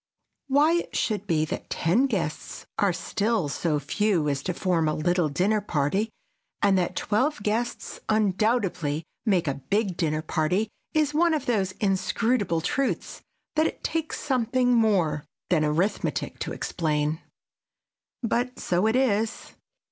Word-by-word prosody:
Why 295 +5 +4
it 345 - -4
should 210 -2 -1
be 155 -4 +2
that - - -5
ten 220 +12 +2
guests 170 - -3
are 200 -2 +4
still 205 +1 0
so 150 +2 0
few 165 +3 +1
as 140 -1 -1
to 180 - -2
form 175 -5 +1
a 155 - +1
little 175 0 +1
dinner 200 +9 +1
party 190 +5 0 0.5
and 200 -1 +4
that 180 -2 0
twelve 240 +4 0
guests 225 +3 -2
undoubtedly 200 -7 +1 0.2
make 180 -5 +2
a 140 - +1 0.2
big 200 -3 +1
dinner 155 -2 0
party 180 +7 0 0.3
is 305 -1 +2
one 330 +1 +3
of 290 -3 -3
those 195 -7 0
inscrutable 200 -1 +1
truths 275 - -1 0.3
that 315 +1 +4
it - - -7
takes 325 -1 -2
something 250 -1 +1
more 185 -10 +2 0.3
than 160 -4 +4
arithmetic 165 +7 -1
to - - -3
explain. 155 -1 -1 1.0
But 245 +2 0
so 180 +4 +1
it 220 - +2
is. 225 -4 0
200 Hz, 140 wpm, -26 LUFS, 165-235 Hz, 1.0 s, Why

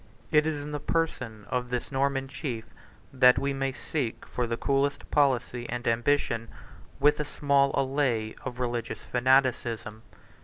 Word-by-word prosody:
It 155 0 +4
is 150 -2 -2
in 150 - -6
the 150 - -3
person 120 -10 -2
of 125 -1 -1
this 125 +3 -3
Norman 135 0 0
chief 130 -4 -5 0.5
that 125 -1 +6
we 140 0 0
may 135 0 -1
seek 135 -3 -3
for 125 -1 -2
the 115 0 -2
coolest 140 +2 0
policy 125 -4 +1
and 120 0 -4
ambition, 115 -1 +1 0.5
with 150 +1 +4
a - - +1
small 140 -1 +2
allay 130 -5 0
of 125 - -6
religious 120 -2 -2
fanaticism. 125 -4 +1
130 Hz, 150 wpm, -28 LUFS, 120-140 Hz, 0.5 s, that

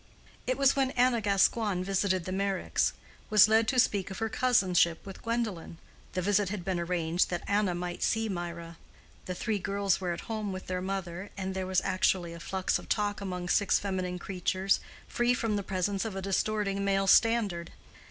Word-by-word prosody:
It 255 - 0
was 275 -1 +4
when 270 -1 +2
Anna 245 -2 +3
Gascoigne, 200 -1 +2
visiting 190 -1 0
the 185 - -5
Meyricks; 195 0 0 0.4
was 215 -1 +7
led 220 +1 +3
to 255 - 0
speak 200 -6 +2
of 190 - -7
her 225 0 -1
cousinship 185 -9 +2
with 195 -1 -9
Gwendolen. 225 -8 -3 0.4
The 185 - -1
visit 205 0 +2
had 190 -3 -5
been 185 -2 -1
arranged 170 0 0
that 175 -1 -3
Anna 200 -3 +1
might 175 0 -5
see 225 0 +1
Mirah; 170 -3 -5 0.5
the 180 - -4
three 215 +2 -1
girls 200 0 0
were 180 -2 -1
at 170 - -4
home 215 -3 -4
with 185 0 -6
their 180 0 -3
mother, 190 0 -4
and 190 -1 -3
there 190 -1 -3
was 185 -1 +1
naturally 185 -2 +1
a 170 - -9
flux 190 +2 -1
of - - -13
talk 205 -1 0
among 180 -2 -4
six 200 +3 +3
feminine 185 -2 -3
creatures, 190 +1 0 0.3
free 240 +1 +1
from 225 -4 -1
the 205 - 0
presence 195 +1 -1
of 220 -4 -5
a 195 - -3
distorting 200 0 0
male 195 0 +1
standard. 200 -5 +3
195 Hz, 190 wpm, -29 LUFS, 180-210 Hz, 0.5 s, was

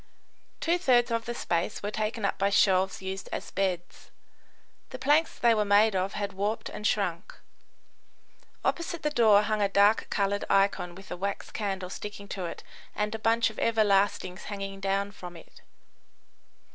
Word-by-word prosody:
Two 340 +2 +1
thirds 245 -7 +3
of 230 0 -1
the 240 - -4
space 175 +2 -2
were 205 - -2
taken 215 0 -2
up - - -1
by 200 +1 +2
shelves 190 -1 +2
used 190 0 -5
as - - -5
beds. 180 -3 -3 0.8
The - - -7
planks 295 +4 +2
they 235 -1 +4
were 215 -1 +2
made 205 +1 +4
of 190 +2 -1
had 200 -1 -3
warped 205 +3 -2
and 210 - -3
shrunk. 190 -3 -1 1.3
Opposite 340 -1 -2
the 300 - 0
door 215 -6 +5
hung 215 0 0
a 200 - +2
dark 200 +2 +4
coloured 200 0 0
icon 195 -3 +2
with 195 +1 -13
a - - -2
wax 200 +2 -4
candle 190 -3 -3
sticking 205 0 -7
to 185 -3 -4
it 170 - -7 0.3
and 210 +1 -1
a 225 - -4
bunch 230 +1 +2
of 220 - -10
everlastings 200 -4 +1
hanging 195 -1 -5
down 195 +1 -1
from 180 -4 -10
it. - - -17
200 Hz, 170 wpm, -28 LUFS, 195-220 Hz, 1.3 s, door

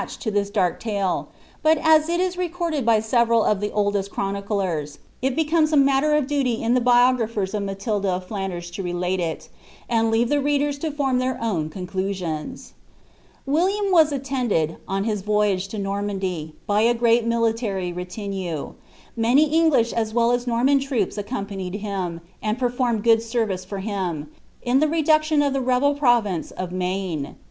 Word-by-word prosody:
h«d - - -7
to 220 - -2
this 200 -1 0
dark 190 -4 0
talc; 200 -5 -2 0.3
but 315 +1 +4
as 315 +1 +4
il 345 +1 0
is 365 0 0
recorded 345 -4 -2
by 225 -1 +4
several 230 0 +2
of 205 -2 +1
ihe 205 - 0
(ilil«st 205 -1 0
clironiclerv. 195 -7 -2 0.2
it 260 0 0
becomes 315 0 +2
a 305 - +3
matter 275 +2 +3
of 300 -3 +2
duty 265 -5 -1
in 230 +1 +2
the 250 - +3
biographers 240 -5 +2
of 210 - -1
MalilJa 200 +1 -2
of 185 -1 -1
Flanders 185 -4 -4
to 185 - -5
relate 180 +1 -2
it, 165 -2 -3 0.4
and 225 -1 +2
leave 230 +1 +2
the 290 -1 +2
readers 290 0 0
to 320 - -2
form 275 -4 0
likeir 255 0 -1
own 180 -3 -3 0.9
William 380 +8 +1
was 320 -4 +5
attended, 255 - -1
on 195 +1 -1
his 210 -2 -1
voyage 205 -2 +1
to 215 - -7
Normandy, 195 -5 -3
by 205 +1 +2
a 235 +2 +3
great 235 0 +3
mili 230 -1 +2
ury 190 -6 -2
retinue; 180 -3 -5 0.4
matiy 260 +7 +3
English 310 -8 +3
aa 230 - +1
well 235 0 +3
as 245 0 -1
Norman 250 +4 +3
troops 265 -8 -1
accompanieJ 200 -3 -4
hiiD,' 185 -5 -3 0.2
and 215 +1 -1
performed 245 -3 0
good 225 -1 +5
service 225 -5 -2
for 195 +2 -6
him, 185 -7 -3 0.3
in 250 +2 +3
the 310 - +3
reduction 310 -1 +2
of 280 -1 +1
the 270 - 0
rebel 255 +3 +2
pt»>vm« 240 - +1
of 185 -1 -5
Maine. 180 -5 -3
225 Hz, 170 wpm, -23 LUFS, 195-270 Hz, 0.9 s, was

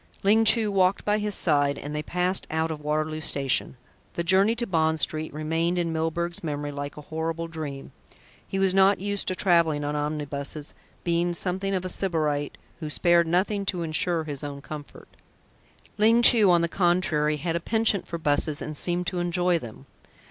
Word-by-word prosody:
Ling 220 +3 +4
Chu 220 -1 +5
walked 190 -1 +1
by 210 +1 +1
his 210 -1 -2
side, 145 -3 +2
and 145 - -7
they 150 - -2
passed 180 +4 0
out 160 +1 -1
of 155 -1 -6
Waterloo 155 +1 -2
station. 135 -3 -1 0.4
The 170 - -1
journey 195 +6 +3
to 235 0 -3
Bond 160 -4 +1
Street 155 0 -1
remained 165 +3 -1
in 170 -2 -1
Milburgh's 170 +2 -2
memory 145 -2 -3
like 145 0 -6
a - - -7
horrible 165 +2 -4
dream. 155 -4 -7 0.6
He 195 - -4
was 195 -1 +3
not 195 +1 +4
used 200 +1 -3
to 185 - -1
travelling 170 -6 +2
on 145 +1 -2
omnibuses, 145 0 -4 0.3
being 170 0 0
something 190 +2 -1
of 185 -1 -3
a - - -3
sybarite 155 -6 -1 0.2
who 155 -3 -5
spared 170 +2 +3
nothing 195 +4 0
to 175 -3 -1
ensure 165 +1 -1
his 145 -2 -7
own 140 -1 -6
comfort. 145 +1 -10 0.9
Ling 230 +3 +4
Chu 220 -5 +7
on 170 -1 +4
the - - +2
contrary 170 -4 +1
had 165 +2 -3
a - - 0
penchant 220 +1 0
for 170 - -4
buses 150 -1 0
and 155 - -4
seemed 175 +4 +1
to 180 0 -2
enjoy 175 0 +1
them. 120 0 -11
165 Hz, 185 wpm, -25 LUFS, 150-185 Hz, 0.9 s, Chu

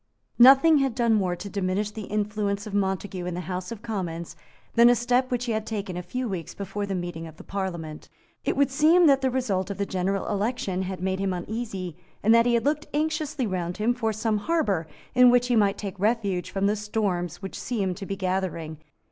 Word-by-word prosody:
Nothing 275 +5 +8
had 270 -4 0
done 235 -2 +2
more 185 -4 +1
to 175 +3 -8
diminish 200 +1 -1
the 215 -1 -7
influence 205 -1 -1
of 210 - -7
Montague 190 -1 -1
in 180 - -3
the 180 - -3
House 180 +2 -5
of 225 -1 -7
Commons 175 -7 -4 0.4
than 235 0 +7
a 245 - +5
step 245 +2 +1
which 245 -1 -1
he 240 - -1
had 220 -1 -1
taken 200 -4 -4
a 180 - -3
few 250 +8 -4
weeks 185 -6 -5
before 200 +1 -4
the 195 - -2
meeting 175 -2 -5
of 160 - -13
the - - -11
Parliament. 170 -6 -5 0.3
It - - -1
would 280 -1 +3
seem 315 +5 +5
that 275 -3 +5
the 265 - +2
result 210 -8 -1
of 200 - -4
the 200 - -1
general 195 +1 -1
election 205 -3 -1
had 185 -1 -4
made 190 0 -1
him 195 -1 0
uneasy, 190 -2 -4 0.3
and 220 +2 +5
that 230 +1 +5
he 240 - +3
had 235 - 0
looked 300 +1 0
anxiously 305 -3 -1
round 180 -3 -3
him 220 +3 +2
for 230 -2 -1
some 215 0 0
harbour 205 - 0 0.3
in 250 0 +7
which 245 0 +3
he 245 - +3
might 205 -2 +3
take 200 -2 -6
refuge 205 -4 0
from 195 0 -1
the 205 +1 +2
storms 205 -5 -2
which 195 - -6
seemed 195 -7 -2
to 195 - -7
be 195 - -2
gathering. 180 -5 -2
205 Hz, 220 wpm, -26 LUFS, 185-240 Hz, 0.4 s, Nothing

